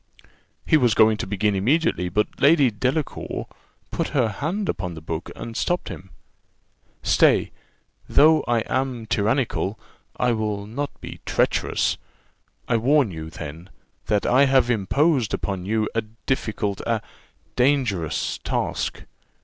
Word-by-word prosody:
He 155 - +5
was 120 -6 +3
going 110 -1 +5
to - - -4
begin 105 +1 +1
immediately, 100 - +1
but 105 +3 -1
Lady 140 -4 +5
Delacour 130 +8 -2 0.5
put - - -1
her 120 -4 +3
hand 170 - -3
upon 90 -2 -3
the - - -7
book, 80 +1 -5
and 115 - -7
stopped 175 +8 -1
him. 95 - -9 0.9
"Stay; - - +4 0.6
though 155 +1 +5
I 120 -1 +2
am 130 -1 -2
tyrannical, 110 -2 0 0.4
I 125 - +2
will 105 -3 -2
not 140 +7 -3
be - - -8
treacherous. - - +1 0.7
I 115 - +2
warn 130 0 +3
you, 80 -1 -7
then, 80 +3 -8 0.4
that 105 -1 +1
I 135 +3 +5
have 130 -2 +3
imposed 125 - +2
upon 95 -2 -4
you 110 0 +1
a 115 - +1
difficult, 110 -3 -3
a 115 -3 0 0.5
dangerous 125 - +1
task. - - -2
115 Hz, 135 wpm, -23 LUFS, 100-135 Hz, 0.9 s, He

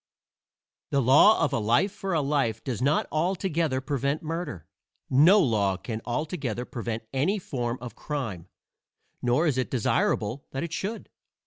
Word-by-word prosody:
II - - -67
The - - +4
law 145 - +6
of - - -3
a - - +1
life 120 - +2
for 195 -2 -3
a 155 - +2
life 135 -6 0
does 125 -4 -3
not 140 +4 +2
altogether 165 -4 0
prevent 140 +2 -1
murder. 160 - -5 0.4
No 160 +10 +7
law 105 - +2
can 110 +4 -5
altogether 125 - -3
prevent 115 -2 -4
any 150 +11 +1
form 125 -9 -3
of 125 0 -8
crime, 115 - -5 0.7
nor 125 +7 +2
is 140 -5 +1
it 130 - -1
desirable 120 0 0
that 135 - -2
it 170 -1 -5
should. 210 +6 -4
135 Hz, 155 wpm, -27 LUFS, 120-160 Hz, 0.7 s, No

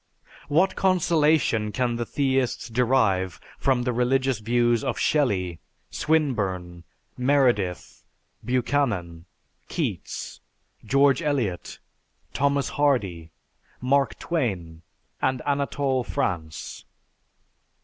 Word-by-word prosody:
What 170 +6 +2
consolation 155 - +2
can 120 0 0
the 120 -1 -3
theists 135 -3 0
derive 110 -7 +1 0.2
from 130 -3 +2
the 125 0 -1
religious 130 0 +1
views 120 +2 +2
of 130 -3 -2
Shelley, 95 - +1 0.3
Swinburne, 95 - -1 0.3
Meredith, 125 -9 +1 0.4
Buchanan, 115 -9 -1 0.4
Keats, - - -4 0.4
George 140 +6 +3
Eliot, 125 - -2 0.6
Thomas 140 0 +1
Hardy, 100 - 0 0.5
Mark 135 +2 +1
Twain, 95 - -3 0.4
and 130 -1 +1
Anatole 140 -2 0
France? 80 -7 -3
125 Hz, 85 wpm, -25 LUFS, 100-140 Hz, 0.6 s, George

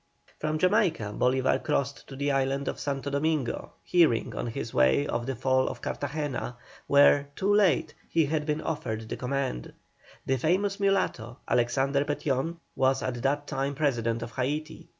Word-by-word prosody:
From 155 0 -1
Jamaica 175 - +2
Bolívar 130 +1 +2
crossed 140 -2 -1
to 135 - -9
the 140 +1 0
island 135 0 0
of - - -3
Santo 140 0 -3
Domingo, 145 -3 -1
hearing 160 -10 +3
on - - -3
his 115 0 -5
way 65 - +4
of 120 -3 -2
the 135 - -2
fall 130 +1 +2
of 120 -2 -6
Cartagena, 145 -4 -3 0.3
where, 140 0 +5
too 200 +2 +1
late, 205 -4 +3 0.2
he 165 -2 +3
had 150 +1 -1
been 150 0 0
offered 110 -8 -3
the - - -3
command. 130 - -3 0.5
The 135 - +1
famous 195 - +1
mulatto, 140 - 0
Alexander 135 +3 +2
Petión, 145 +2 -1 0.2
was 135 0 +2
at 120 -2 -3
that 145 +2 0
time 140 -1 -2
President 120 -6 0
of - - -7
Haiti. 150 +5 -3
140 Hz, 160 wpm, -28 LUFS, 125-155 Hz, 0.5 s, where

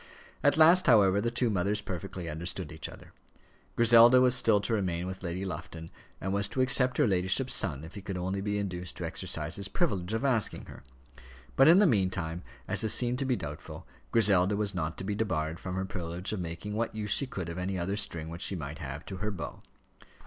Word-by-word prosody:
At - - +3
last, 170 +3 +6
however, 100 -5 +5
the 115 - 0
two 120 0 0
mothers 100 +2 0
perfectly 90 -2 -6
understood 85 +2 -5
each 80 -2 -7
other. - - -14 0.6
Griselda 120 +2 +7
was 125 -1 +5
still 110 -4 +4
to 115 - -2
remain 90 -5 -1
with 95 0 -6
Lady 90 +1 -4
Lufton; 85 -2 -7 0.3
and 95 +1 -3
was 100 0 +1
to 130 - -2
accept 130 0 +3
her - - +3
ladyship's 95 +6 +1
son, 75 -8 0
if 80 - -10
he 100 - -8
could 95 -1 -5
only 95 +2 -3
be 105 +1 -2
induced 90 -3 -4
to 90 - -4
exercise 80 -2 -3
his 100 0 -3
privilege 100 - -1
of 115 - -2
asking 120 -6 0
her; - - -12 0.7
but 135 - +6
in 170 +3 +8
the 205 - +6
meantime, 95 - 0 0.3
as - - +1
this 110 - +4
seemed 125 0 +1
to 135 - -1
be 130 -1 +1
doubtful, 75 -7 -8 0.3
Griselda 100 -3 +3
was 105 -1 -1
not 85 -3 -3
to - - -6
be 105 +2 -2
debarred 80 -7 -2
from 90 -1 -5
her 95 0 -2
privilege 90 0 -4
of 105 - -3
making 85 +4 -5
what 115 0 -2
use 105 -2 -3
she 140 - +3
could 95 -8 -5
of 85 +1 -5
any 95 +1 -3
other 90 +3 -2
string 85 -6 -3
which 85 +2 -8
she 100 - +1
might 75 -2 -6
have 70 -1 -7
to 95 - -7
her 105 +3 -2
bow. 95 -5 -7
95 Hz, 220 wpm, -29 LUFS, 85-110 Hz, 0.7 s, in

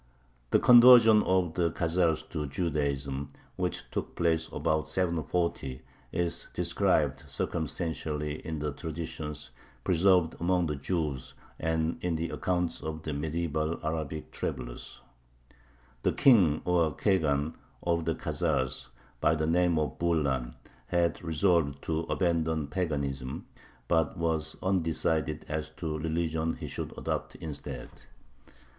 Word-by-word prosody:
The - - +5
conversion 120 -3 +8
of 90 -4 +1
the 85 -1 +1
Khazars 80 -2 +1
to 75 -3 -2
Judaism, 70 -3 -1 0.3
which - - -2
took - - -4
place 80 -1 +1
about 80 0 0
740, 85 -5 -1 0.3
is 85 -1 -2
described - - +1
circumstantially 80 -2 -3
in 80 -1 -4
the 75 0 -2
traditions 80 -2 -6 0.3
preserved 90 -1 +4
among 90 +1 +2
the 75 -2 -1
Jews 70 -3 -3 0.2
and 80 0 -1
in 90 -2 0
the 80 +1 -2
accounts 90 -2 -1
of 80 0 -5
the 80 - -3
medieval 80 +1 -1
Arabic 80 -1 -3
travelers: - - -5 1.0
The - - +1
King, 95 - +5
or 85 -4 +2
Khagan, 80 -6 +1 0.3
of 85 -1 0
the 80 - 0
Khazars, 75 -6 -1 0.3
by 80 - +3
the 80 0 0
name 85 +1 +3
of 75 -1 -1
Bulan, 70 -8 0 0.3
had 85 -2 +1
resolved 80 -4 +1
to 80 -1 -1
abandon 80 -4 0
paganism, 70 -7 -2 0.4
but 80 -3 +1
was 80 -2 -1
undecided 80 -4 0
as 75 0 -3
to 80 - -3
the 80 +1 -2
religion 80 0 0
he - - -7
should - - -5
adopt - - -3
instead. 70 -5 -6
80 Hz, 125 wpm, -29 LUFS, 75-85 Hz, 1.0 s, conversion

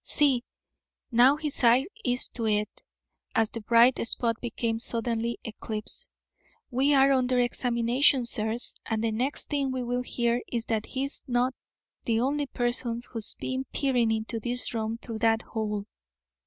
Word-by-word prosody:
See! 275 -5 +3 0.7
Now 245 +4 +6
his 300 -4 -3
eye 245 +3 +5 0.2
is 245 -5 -1
to 230 -2 -3
it" 210 -1 -1 0.5
(as 225 -2 +2
the 230 - -6
bright 235 +4 +4
spot 230 0 +1
became 230 -1 -2
suddenly 230 0 -1
eclipsed). 215 -1 0 0.6
"We 275 +4 +3
are 270 0 +5
under 255 -1 +2
examination, 245 +1 +2
sirs, 225 +1 +1
and 225 -1 -1
the 225 - +1
next 250 +6 -2
thing 280 -3 0
we 260 -1 -3
will 245 +1 -1
hear 240 -1 0
is 235 -2 -2
that 220 -1 -2
he's 275 +2 -3
not 250 +1 +1 0.5
the 225 -1 +1
only 285 +4 0
person 240 -1 0
who's 225 -3 -2
been 260 +1 -4
peering 250 -5 +1
into 225 +1 -2
this 245 +3 -3
room 225 0 -2
through 230 -2 -7
that 225 0 +2
hole." 210 -2 -3
240 Hz, 155 wpm, -27 LUFS, 225-255 Hz, 0.7 s, Now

